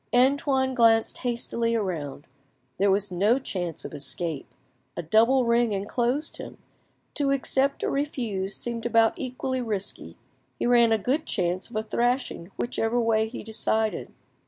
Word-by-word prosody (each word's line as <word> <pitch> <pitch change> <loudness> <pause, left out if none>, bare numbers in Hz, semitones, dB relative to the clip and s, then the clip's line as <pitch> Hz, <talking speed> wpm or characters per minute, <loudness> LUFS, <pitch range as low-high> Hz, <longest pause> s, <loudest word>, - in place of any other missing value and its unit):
Antoine 265 +1 +3
glanced 225 -2 +3
hastily 235 -1 -1
round; 160 -9 -4 0.5
there 200 +1 +4
was 200 0 +1
no 205 +7 +3
chance 180 - -4
of - - -7
escape, 145 +2 -3 0.5
a 170 - -3
double 230 - +4
ring 235 -1 +2
enclosed 240 +9 -1
him. - - -9 0.6
To 285 -2 0
accept 275 0 +1
or - - 0
refuse 230 -9 -2
seemed 235 -1 -3
about 230 -1 +4
equally 255 0 -3
risky; 210 -5 -4 0.4
he - - -2
ran 240 -1 +5
a 225 - +4
good 255 +9 -1
chance 180 +1 -1
of 235 - -12
a 215 - 0
thrashing 240 -5 -1
whichever 240 -1 0
way 220 -1 +2
he 230 - -7
decided. 220 0 -1
230 Hz, 145 wpm, -26 LUFS, 200-250 Hz, 0.6 s, ran